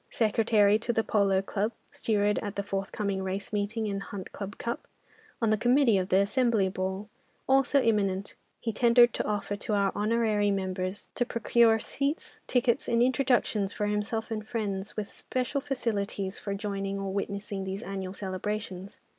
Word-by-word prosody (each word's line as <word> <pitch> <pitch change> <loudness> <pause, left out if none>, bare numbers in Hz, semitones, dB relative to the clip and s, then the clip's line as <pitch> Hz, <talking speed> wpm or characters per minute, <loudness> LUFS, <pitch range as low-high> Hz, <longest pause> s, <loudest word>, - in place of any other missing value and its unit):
Secretary 215 -2 +3
to 235 - -1
the 225 -1 +1
polo 195 -3 +2
club, 210 +3 -1 0.2
steward 210 -2 +1
at 205 -2 -5
the 200 - -1
forthcoming 195 0 -2
Race 190 +2 -4
meeting 210 +2 -1
and 200 -1 -2
Hunt 200 -1 -7
Club 200 0 -6
Cup, 235 +1 -4 0.5
on 225 -2 +2
the 215 - +2
committee 245 -3 +4
of 185 0 -2
the 185 - +4
Assembly 215 0 +2
Ball, 190 +2 -3 0.4
also 270 +1 +4
imminent, 200 -3 +1 0.3
he 230 - -2
tendered 240 +1 +5
an - - 0
offer 205 -1 -1
to 210 +1 -2
our 200 -1 +2
honorary 215 -1 +2
member 185 -1 -1
to 205 +5 -4
procure 235 -1 +4
seats, 280 +7 -3
tickets, 250 +1 +1
and 235 0 +4
introductions 245 -6 +2
for 210 - -1
himself 210 +2 -2
and 215 -1 -3
friends, 205 -4 -3
with 210 -2 -2
special 255 +5 -3
facilities 205 -8 -2
for 200 -1 -3
joining 200 -1 -3
or 195 -1 -3
witnessing 200 0 -3
these 190 +3 -4
annual 190 -2 -5
celebrations. 195 0 -4
210 Hz, 165 wpm, -29 LUFS, 195-230 Hz, 0.5 s, tendered